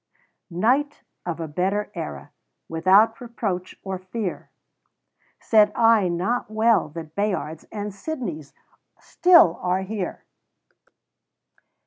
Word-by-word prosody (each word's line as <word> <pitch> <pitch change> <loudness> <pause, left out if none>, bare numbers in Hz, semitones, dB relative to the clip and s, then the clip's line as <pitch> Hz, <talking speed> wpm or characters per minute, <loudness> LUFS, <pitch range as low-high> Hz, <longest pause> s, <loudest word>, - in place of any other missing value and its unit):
Knight 250 - 0 0.2
of 170 -1 -3
a 165 - -4
better 190 +7 -1
era - - -7 0.4
Without 195 +8 +3
reproach 205 -7 -4
or 190 -1 -4
fear, 190 +1 -5 0.9
Said 210 -2 +4
I 225 -4 +4
not 185 +8 -1
well 220 -5 +2
that 160 -2 -8
Bayards 185 -5 -2
And 205 -1 -5
Sidneys 195 - -6 0.5
still 340 - +5
are 180 +1 0
here!" 195 -2 -5
200 Hz, 100 wpm, -23 LUFS, 180-225 Hz, 0.9 s, still